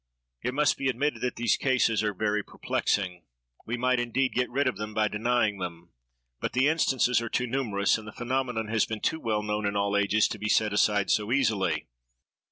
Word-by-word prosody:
It 125 - -3
must 150 0 +2
be 135 - 0
admitted 140 +4 -1
that 125 -1 -1
these 120 -2 +2
cases 125 -5 +2
are 105 -1 0
very 105 +1 0
perplexing. 95 -3 -2 0.5
We 115 +2 -2
might, 125 0 +2
indeed, 125 +2 0
get 125 0 0
rid 140 +2 0
of 125 - -1
them 105 +1 -6
by 110 0 +2
denying 110 -1 0
them; 85 -1 -7 0.5
but - - -3
the 130 +3 +3
instances 130 -6 +2
are 115 - -4
too 125 - 0
numerous, 115 -6 0
and 110 - -11
the - - -7
phenomenon 125 -2 -2
has 110 -2 +1
been 110 -1 -5
too 160 - 0
well 110 -5 -1
known 105 0 -2
in 100 - -2
all 100 0 0
ages, 100 +1 +3
to 105 - -6
be 105 +1 -2
set 105 -1 +2
aside 105 -1 +2
so 105 +1 +1
easily. 100 - +1
110 Hz, 205 wpm, -27 LUFS, 105-125 Hz, 0.5 s, the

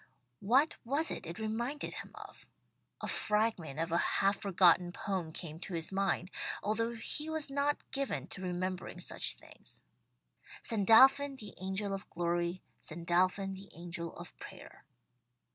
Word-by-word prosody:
What 260 +10 +3
was 285 +7 +2
it 185 - -5
it 170 +2 -6
reminded 235 +7 -2
him - - -5
of? - - -12 0.5
A - - -3
fragment 210 -9 +1
of 165 0 -1
a 170 - +3
half 195 +1 +2
forgotten 180 -2 +5
poem 185 -4 -3
came 160 -1 -6
to 180 0 -5
his 165 +1 -1
mind, 195 -1 0 0.3
although 230 +3 0
he 300 +7 -2
was 315 -3 +1
not 285 +1 +2
given 275 -1 -1
to 185 - -7
remembering 185 0 -3
such - - -3
things: - - -12 0.8
"Sandalphon 260 +6 +6
the 210 -6 -9
angel 190 +2 -2
of 195 - -5
glory, 175 +1 -1 0.2
Sandalphon 180 +4 +1
the 195 +1 -10
angel 170 -1 -6
of - - -10
prayer." - - -11
195 Hz, 145 wpm, -33 LUFS, 175-230 Hz, 0.8 s, Sandalphon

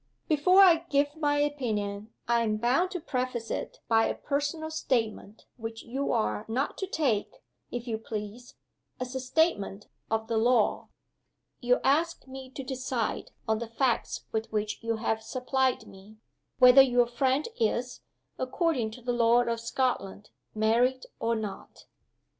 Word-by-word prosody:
"Before 365 +5 +5
I 340 -3 +6
give 285 +1 +1
my 295 -2 +1
opinion 220 -8 -2 0.2
I 235 0 +3
am 215 -2 0
bound 255 +11 +2
to 365 -1 -4
preface 255 -5 -3
it - - -4
by 225 -1 +4
a - - -2
personal 295 +3 -2
statement 225 -8 -2
which 225 -1 -6
you 270 +4 -2
are 105 -1 0
not 255 +6 -1
to 385 - -2
take, 275 - 0 0.4
if 245 0 -5
you 220 -2 -2
please, 220 +2 -7 0.4
as 255 0 -4
a 260 - -2
statement 250 - 0 0.2
of 220 0 0
the 225 -1 +1
law. 235 -1 +2 0.7
You 250 0 +2
ask 315 +1 +1
me 265 0 -9
to 270 +1 -7
decide 255 -3 -3 0.2
on 220 0 +1
the 235 - -4
facts 240 +1 -1
with 220 +1 -3
which 215 0 -2
you 230 0 -1
have 220 0 -1
supplied 260 +2 0
me 195 +3 -15 0.4
whether 250 +1 +9
your 245 -2 +4
friend 260 +4 0
is, 240 +3 -1 0.4
according 255 -3 0
to 250 - -15
the 245 0 -1
law 240 0 +4
of 235 -1 -2
Scotland, 230 -5 -2 0.2
married 240 +4 +2
or 230 0 +1
not?" 215 -3 -7
245 Hz, 155 wpm, -28 LUFS, 225-270 Hz, 0.7 s, whether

